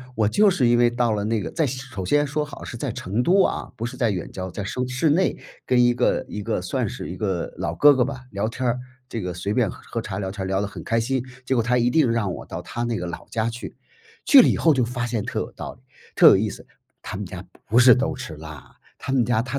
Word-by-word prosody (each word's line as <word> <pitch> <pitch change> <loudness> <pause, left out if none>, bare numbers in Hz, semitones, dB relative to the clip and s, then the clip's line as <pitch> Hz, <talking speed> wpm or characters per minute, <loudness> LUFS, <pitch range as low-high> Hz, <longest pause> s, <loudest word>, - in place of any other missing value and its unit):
我 110 -2 +2
就 205 - +4
是 145 -10 +2
因 120 0 +4
为 120 0 +5
到 120 -1 0
了 105 -1 -1
那 110 0 0
个 - - -5
在 160 - +1
首 125 -6 -5
先 145 +10 +3
说 150 +1 -2
好 145 - -10
是 120 - -7
在 130 +1 -3
成 105 +4 -2
都 190 +8 +4
啊， - - -2
不 115 - -4
是 120 - -6
在 115 -3 +2
远 90 -3 -4
郊， 95 0 -5
在 100 +3 -5
生 125 +5 -3
市 130 +5 +1
内 180 +6 +2 0.3
跟 125 -1 +4
一 120 0 +4
个 120 0 +1
一 105 - -5
个 - - -2
算 - - -1
是 - - -6
一 90 - -7
个 95 -4 -2
老 - - -3
哥 145 0 +7
哥 125 -2 +3
吧 130 -1 -6
聊 100 +2 -1
天 130 +3 -4
儿， 120 +1 0 0.3
这 115 - -4
个 90 -1 -4
随 90 +4 -3
便 120 -4 +2
喝 - - -10
喝 - - -4
茶 - - -5
聊 95 -1 -3
天 100 -1 -5
儿 - - -4
聊 95 +1 0
得 105 - -2
很 - - -9
开 115 0 +1
心。 130 +2 0 0.2
结 130 - 0
果 115 - +3
他 125 +2 +2
一 120 0 +3
定 135 -1 +3
让 105 -6 0
我 - - -8
到 - - -6
他 120 - -5
那 120 -1 -1
个 90 - -4
老 85 - -7
家 115 0 -1
去， 120 +2 -8 0.5
去 280 -3 +9
了 - - +4
以 - - +2
后 160 -2 +4
就 125 -3 +1
发 120 0 -3
现 115 -3 -2
特 - - -3
有 - - -4
道 - - -7
理、 120 - -25 0.3
特 - - +8
有 - - +8
意 105 +1 0
思。 - - -10 2.3
他 130 - -4
们 125 -3 +3
家 115 -1 +1
不 130 - -8
是 140 - 0
120 Hz, 285 characters per minute, -23 LUFS, 105-130 Hz, 2.3 s, 去